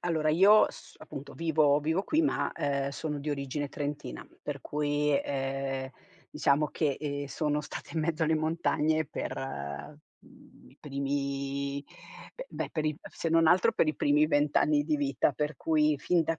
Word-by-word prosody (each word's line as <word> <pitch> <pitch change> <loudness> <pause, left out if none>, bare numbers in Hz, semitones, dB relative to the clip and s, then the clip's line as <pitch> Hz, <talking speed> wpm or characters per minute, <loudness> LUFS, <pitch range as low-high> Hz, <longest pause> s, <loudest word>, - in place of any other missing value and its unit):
allora 160 -3 0
io 195 +7 +7
s - - -14
appunto, 140 +1 -9
vivo 155 -3 +3
vivo 160 +5 0
qui 315 +1 +2
ma, 295 - 0
ehm, 140 -1 -1
sono 150 +1 -4
di 145 +2 -3
origine 140 0 -3
trentina, 145 - -5 0.2
per - - -4
cui, 145 -1 +1
ehm, 135 -1 -3 0.4
diciamo 150 0 +2
che, 145 -3 0
ehm, 145 -1 -3
sono 150 +1 -1
stata - - -8
in 160 - +1
mezzo 160 0 -1
alle 160 0 +3
montagne 155 0 +1
per, 150 - -5
mhmm, 135 - -9
i - - -22
primi 140 0 -2 0.5
beh - - -7
beh, - - -4
per 155 -2 -2
i 155 -1 0
se 165 - -3
non 165 0 +5
altro, 180 +2 +5
per 155 - +2
i 155 - 0
primi 150 +1 +3
20 145 -1 +1
anni 150 -1 +3
di 155 0 +1
vita. 140 0 +1
Per 150 +1 -2
cui, 155 -2 +2
fin 175 +3 +2
da 165 0 -2
150 Hz, 170 wpm, -29 LUFS, 140-155 Hz, 0.5 s, io